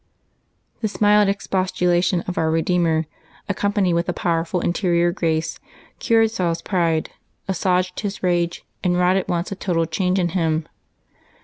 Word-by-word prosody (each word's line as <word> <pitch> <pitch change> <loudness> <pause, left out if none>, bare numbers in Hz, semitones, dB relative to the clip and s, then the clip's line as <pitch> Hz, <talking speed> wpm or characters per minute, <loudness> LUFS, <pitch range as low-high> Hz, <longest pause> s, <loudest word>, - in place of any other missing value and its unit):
This 215 -3 -3
mild 210 -1 +5
expostulation 185 -2 +1
of 180 +1 -5
Our 160 -1 +1
Eedeemer, 165 0 +1 0.4
accompanied 200 -2 +1
with 170 +1 0
a - - 0
powerful 170 +1 -1
interior 175 -1 +1
grace, 160 -3 -1 0.4
cured 225 -2 +3
Saul's 170 -5 -1
pride, 165 -4 0 0.4
assuaged 180 -1 0
his 205 -2 -4
rage, 175 -1 0 0.2
and 180 -1 +2
wrought 180 +1 +3
at 190 - -2
once 170 +2 -1
a - - -3
total 170 -4 0
change 180 +3 0
in 175 -2 +1
him. 160 -3 0
180 Hz, 140 wpm, -21 LUFS, 170-190 Hz, 0.4 s, mild